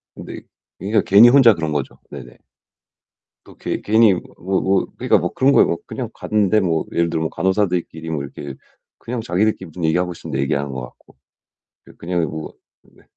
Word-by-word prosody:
근데 -, -, -9 dB, 0.4 s
그러니까 105 Hz, +3 st, +1 dB
괜히 105 Hz, +5 st, +8 dB
혼자 125 Hz, -4 st, +7 dB
그런 80 Hz, -3 st, -3 dB
거죠. 70 Hz, -3 st, -3 dB
네네. 65 Hz, -4 st, -11 dB, 1.1 s
또 -, -, -17 dB
괘 -, -, -4 dB
괜히 110 Hz, -1 st, +4 dB
뭐 90 Hz, -, -4 dB
뭐 95 Hz, +1 st, -1 dB
뭐 95 Hz, 0 st, +1 dB
그러니까 -, -, +3 dB
뭐 85 Hz, -, -3 dB
그런 135 Hz, +1 st, +3 dB
거예요. -, -, +5 dB
뭐 85 Hz, -, -1 dB
그냥 -, -, -5 dB
갔는데 105 Hz, 0 st, +1 dB
뭐 85 Hz, -5 st, 0 dB
예를 85 Hz, 0 st, +1 dB
들어 80 Hz, -1 st, -2 dB
뭐 80 Hz, -, -1 dB
간호사들끼리 90 Hz, -4 st, -1 dB
뭐 75 Hz, -3 st, -3 dB
이렇게 70 Hz, 0 st, -8 dB, 0.4 s
그냥 120 Hz, -1 st, -5 dB
자기들끼리 95 Hz, +1 st, 0 dB
무슨 85 Hz, +2 st, -8 dB
얘기하고 90 Hz, +3 st, +1 dB
있음 -, -, -10 dB
내 65 Hz, -, -2 dB
얘기하는 70 Hz, +1 st, -1 dB
것 65 Hz, -1 st, -5 dB
같고. 60 Hz, -, -14 dB, 0.7 s
예. -, -, -15 dB
그냥 85 Hz, 0 st, -2 dB
뭐 80 Hz, +1 st, -7 dB, 0.3 s
네. -, -, -24 dB
90 Hz, 380 characters per minute, -20 LUFS, 80-105 Hz, 1.1 s, 괜히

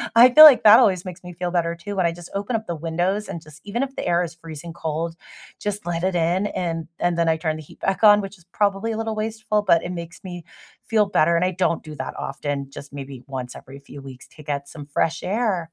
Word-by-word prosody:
I 245 Hz, +2 st, +9 dB
feel 310 Hz, 0 st, +12 dB
like 280 Hz, -5 st, +8 dB
that 215 Hz, +1 st, +9 dB
always 185 Hz, -2 st, +3 dB
makes 180 Hz, -1 st, -8 dB
me 180 Hz, 0 st, -9 dB
feel 175 Hz, +1 st, -3 dB
better 170 Hz, -1 st, 0 dB
too 200 Hz, +4 st, -7 dB
when 185 Hz, -, +2 dB
I -, -, 0 dB
just 175 Hz, 0 st, -12 dB
open 205 Hz, +4 st, -2 dB
up 220 Hz, 0 st, -2 dB
the 170 Hz, -, -3 dB
windows 175 Hz, +6 st, -1 dB
and 170 Hz, -, -6 dB
just 155 Hz, 0 st, -15 dB
even 235 Hz, +6 st, -2 dB
if 270 Hz, 0 st, -6 dB
the -, -, -4 dB
air 175 Hz, +1 st, +2 dB
is 170 Hz, -1 st, -6 dB
freezing 165 Hz, 0 st, -9 dB
cold, 165 Hz, 0 st, -3 dB, 0.4 s
just 205 Hz, -2 st, -4 dB
let 170 Hz, 0 st, -2 dB
it 185 Hz, -1 st, 0 dB
in 175 Hz, +4 st, +1 dB
and 165 Hz, -4 st, -3 dB
and 175 Hz, -1 st, 0 dB
then 170 Hz, -1 st, +2 dB
I 160 Hz, -, +3 dB
turn 155 Hz, -1 st, -2 dB
the -, -, -8 dB
heat 150 Hz, -, -16 dB
back 195 Hz, +3 st, -1 dB
on, 205 Hz, 0 st, +7 dB
which 195 Hz, 0 st, -8 dB
is 170 Hz, -, -23 dB
probably 205 Hz, +2 st, 0 dB
a -, -, -4 dB
little 225 Hz, -1 st, -3 dB
wasteful, 215 Hz, -1 st, -1 dB
but 170 Hz, -4 st, +3 dB
it 175 Hz, -, -4 dB
makes 170 Hz, +2 st, -8 dB
me 175 Hz, -2 st, -7 dB, 0.4 s
feel 215 Hz, -2 st, +3 dB
better 170 Hz, -3 st, +3 dB
and 170 Hz, -, +2 dB
I 185 Hz, -, 0 dB
don't 180 Hz, -2 st, 0 dB
do 155 Hz, -1 st, -9 dB
that -, -, -5 dB
often, 140 Hz, 0 st, -4 dB
just 140 Hz, 0 st, -10 dB
maybe 135 Hz, -2 st, -8 dB
once 130 Hz, -2 st, -6 dB
every 135 Hz, +1 st, -11 dB
few 140 Hz, 0 st, -12 dB
weeks 130 Hz, -2 st, -12 dB
to 155 Hz, -, -15 dB
get 140 Hz, -1 st, -4 dB
some 145 Hz, -2 st, -9 dB
fresh 155 Hz, +3 st, -1 dB
air. 205 Hz, -2 st, 0 dB
175 Hz, 260 wpm, -22 LUFS, 160-200 Hz, 0.4 s, feel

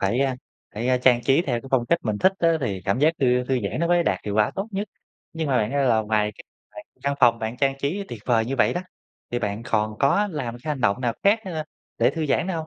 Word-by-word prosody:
phải, 105 Hz, +7 st, +1 dB
a, 135 Hz, -2 st, +1 dB, 0.4 s
phải 125 Hz, +4 st, +1 dB
trang 120 Hz, -2 st, +4 dB
trí 140 Hz, +5 st, +3 dB
theo 120 Hz, -6 st, -1 dB
phong 120 Hz, -3 st, +2 dB
cách 170 Hz, -, +2 dB
mình 105 Hz, -2 st, -2 dB
thích 190 Hz, -, +4 dB
á 170 Hz, -, +3 dB
thì 95 Hz, -7 st, -2 dB
cảm 100 Hz, +6 st, 0 dB
giác 155 Hz, +3 st, +5 dB
thư 125 Hz, -1 st, +3 dB
thư 130 Hz, 0 st, 0 dB
giãn 100 Hz, -, -3 dB
nó 170 Hz, -, +2 dB
mới 175 Hz, 0 st, +4 dB
đạt -, -, 0 dB
hiệu 105 Hz, -1 st, -3 dB
quả 105 Hz, 0 st, +3 dB
tốt 195 Hz, +3 st, -3 dB
nhất. 200 Hz, +1 st, -3 dB, 0.4 s
Nhưng 160 Hz, -3 st, -3 dB
mà 130 Hz, -, +2 dB
bạn 110 Hz, +2 st, 0 dB
ơi, 140 Hz, -1 st, +1 dB
là 115 Hz, -2 st, +3 dB
ngoài 105 Hz, -1 st, 0 dB
cái -, -, -14 dB, 0.3 s
bạn -, -, -9 dB, 0.2 s
căn 140 Hz, 0 st, 0 dB
phòng 115 Hz, -2 st, +5 dB
bạn 110 Hz, +2 st, -4 dB
trang 135 Hz, 0 st, +1 dB
trí 175 Hz, +9 st, -2 dB
tuyệt 110 Hz, -3 st, -8 dB
vời 115 Hz, -3 st, +3 dB
như 135 Hz, +3 st, -3 dB
vậy 120 Hz, -, +3 dB
đó, 175 Hz, -, -1 dB, 0.5 s
thì 120 Hz, -, +1 dB
bạn 105 Hz, 0 st, -3 dB
còn 110 Hz, -2 st, 0 dB
có 200 Hz, +9 st, +3 dB
làm 130 Hz, -7 st, -4 dB
cái 155 Hz, -, -8 dB
hành 140 Hz, -3 st, -3 dB
động 100 Hz, +1 st, +1 dB
nào 120 Hz, -2 st, 0 dB
khác, 210 Hz, +3 st, +4 dB
ơ, 160 Hz, -5 st, -4 dB, 0.3 s
để -, -, +4 dB
thư 160 Hz, -2 st, -3 dB
giãn 145 Hz, -, +1 dB
nữa 190 Hz, -, -2 dB
hông? 160 Hz, -1 st, -4 dB
130 Hz, 275 wpm, -24 LUFS, 115-155 Hz, 0.5 s, giác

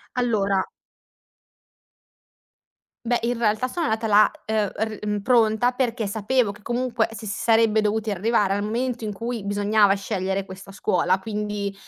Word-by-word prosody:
Allora 200 Hz, -6 st, +1 dB, 2.4 s
beh, 240 Hz, +1 st, +1 dB
in 240 Hz, +1 st, -1 dB
realtà 220 Hz, +2 st, +1 dB
sono 335 Hz, +4 st, -2 dB
andata 220 Hz, 0 st, -1 dB
là, 210 Hz, 0 st, +6 dB
ehm, 215 Hz, -1 st, 0 dB
r 210 Hz, -1 st, -3 dB
pronta 235 Hz, 0 st, +3 dB
perché 245 Hz, -3 st, -1 dB
sapevo 220 Hz, +3 st, 0 dB
che 210 Hz, +1 st, -15 dB
comunque 240 Hz, 0 st, -1 dB
s 225 Hz, -, -10 dB
si 220 Hz, -, -8 dB
sarebbe 225 Hz, +2 st, +2 dB
dovuti 215 Hz, 0 st, 0 dB
arrivare 205 Hz, 0 st, +1 dB
al 205 Hz, -, -1 dB
momento 235 Hz, +2 st, -2 dB
in 210 Hz, -, -3 dB
cui 230 Hz, 0 st, -5 dB
bisognava 205 Hz, 0 st, +3 dB
scegliere 195 Hz, -1 st, -2 dB
questa 190 Hz, +1 st, -11 dB
scuola. 180 Hz, -1 st, +1 dB
Quindi, 205 Hz, -1 st, -3 dB
215 Hz, 140 wpm, -23 LUFS, 200-230 Hz, 2.4 s, là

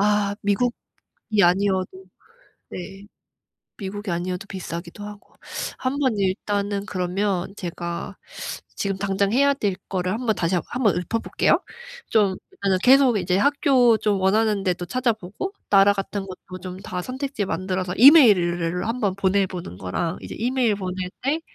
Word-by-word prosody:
아 205 Hz, 0 st, +2 dB
미국이 205 Hz, +5 st, +1 dB, 0.7 s
아니어도 190 Hz, +1 st, +3 dB, 0.8 s
네. 195 Hz, +2 st, -8 dB, 0.7 s
미국이 205 Hz, 0 st, -5 dB
아니어도 180 Hz, +2 st, -3 dB
비싸기도 175 Hz, 0 st, -7 dB
하고. 205 Hz, -1 st, -11 dB, 0.4 s
한번 260 Hz, -3 st, 0 dB
일단은 200 Hz, +1 st, -1 dB
그러면 185 Hz, 0 st, -1 dB
제가 170 Hz, -2 st, -5 dB, 0.6 s
지금 195 Hz, -1 st, -1 dB
당장 200 Hz, 0 st, 0 dB
해야 280 Hz, +3 st, +4 dB
될 205 Hz, -8 st, -1 dB
거를 185 Hz, -1 st, -1 dB
한번 225 Hz, -1 st, 0 dB
다시 170 Hz, +2 st, 0 dB
한 175 Hz, -, +1 dB
한 255 Hz, -, -3 dB
번 195 Hz, -6 st, +4 dB
읊어 180 Hz, +6 st, -1 dB
볼게요. -, -, +1 dB, 0.5 s
좀 200 Hz, -4 st, +2 dB, 0.2 s
일단 195 Hz, -2 st, 0 dB
계속 260 Hz, -3 st, +6 dB
이제 180 Hz, 0 st, 0 dB
학교 265 Hz, -2 st, +4 dB
좀 205 Hz, -2 st, 0 dB
원하는 210 Hz, +1 st, +2 dB
데도 180 Hz, -2 st, -1 dB
찾아보고 235 Hz, -, -2 dB, 0.2 s
나라 200 Hz, 0 st, +6 dB
같은 200 Hz, 0 st, -4 dB
것도 185 Hz, -1 st, -10 dB
좀 185 Hz, -1 st, -6 dB
다 180 Hz, -2 st, -5 dB
선택지 260 Hz, -1 st, -3 dB
만들어서 185 Hz, 0 st, -2 dB
이메일을 180 Hz, -, +6 dB
한번 220 Hz, -5 st, -1 dB
보내 195 Hz, 0 st, +2 dB
보는 175 Hz, -, -7 dB
거랑 160 Hz, -, -3 dB
이제 -, -, -8 dB
이메일 240 Hz, -1 st, +1 dB
보낼 185 Hz, -1 st, -4 dB
때 290 Hz, +5 st, 0 dB
195 Hz, 300 characters per minute, -23 LUFS, 185-220 Hz, 0.8 s, 계속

